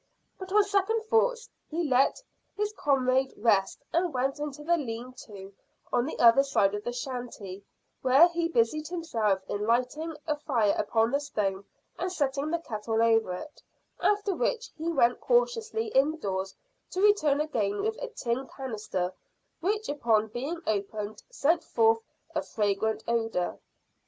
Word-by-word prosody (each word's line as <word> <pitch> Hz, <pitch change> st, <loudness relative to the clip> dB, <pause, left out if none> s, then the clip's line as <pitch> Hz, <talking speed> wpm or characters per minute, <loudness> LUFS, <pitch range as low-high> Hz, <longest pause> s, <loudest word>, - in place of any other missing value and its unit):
But 375 Hz, 0 st, -8 dB
on 420 Hz, +1 st, +5 dB
second 405 Hz, +2 st, +1 dB
thoughts 465 Hz, +2 st, +1 dB, 0.2 s
he 335 Hz, +2 st, -1 dB
let 265 Hz, -, +2 dB, 0.3 s
his 420 Hz, +1 st, -1 dB
comrade 265 Hz, -3 st, +1 dB
rest 205 Hz, +2 st, +2 dB
and 345 Hz, +1 st, +2 dB
went 265 Hz, +2 st, -1 dB
into 295 Hz, 0 st, -5 dB
the 345 Hz, +3 st, +3 dB
lean 250 Hz, -4 st, -5 dB
to 200 Hz, -2 st, -10 dB, 0.4 s
on 240 Hz, +2 st, +2 dB
the -, -, -5 dB
other 235 Hz, +3 st, +7 dB
side 240 Hz, -8 st, +2 dB
of 205 Hz, 0 st, -4 dB
the 240 Hz, -, -2 dB
shanty, 240 Hz, -6 st, -6 dB, 0.4 s
where 265 Hz, +6 st, +7 dB
he 340 Hz, -1 st, -1 dB
busied 305 Hz, +1 st, +1 dB
himself 230 Hz, -, -1 dB
in 205 Hz, +1 st, -2 dB
lighting 275 Hz, +7 st, 0 dB
a 300 Hz, -2 st, 0 dB
fire 235 Hz, -9 st, +1 dB
upon 225 Hz, +2 st, +1 dB
the 280 Hz, -, +2 dB
stone 200 Hz, -9 st, -2 dB, 0.3 s
and 365 Hz, -, -1 dB
setting 285 Hz, -3 st, -1 dB
the 340 Hz, -, +1 dB
kettle 225 Hz, -7 st, -3 dB
over 225 Hz, -4 st, +3 dB
it, 295 Hz, +12 st, -8 dB, 0.4 s
after 410 Hz, -1 st, +2 dB
which 470 Hz, +5 st, -1 dB
he 325 Hz, +1 st, -2 dB
went 245 Hz, -6 st, +3 dB
cautiously 455 Hz, -2 st, +1 dB
indoors, 235 Hz, -, 0 dB, 0.3 s
to 370 Hz, -, -4 dB
return 310 Hz, -9 st, +4 dB
again 220 Hz, -10 st, -1 dB
with 440 Hz, +1 st, 0 dB
a -, -, -3 dB
tin 265 Hz, -, -3 dB
canister, 210 Hz, -8 st, -4 dB, 0.5 s
which 420 Hz, +5 st, -1 dB
upon 225 Hz, -6 st, +1 dB
being 275 Hz, +10 st, -4 dB
opened 210 Hz, 0 st, -3 dB
sent 330 Hz, +4 st, +1 dB
forth 225 Hz, 0 st, +3 dB, 0.3 s
a -, -, 0 dB
fragrant 215 Hz, +1 st, -1 dB
odour. 225 Hz, -6 st, -1 dB
265 Hz, 150 wpm, -28 LUFS, 220-335 Hz, 0.5 s, other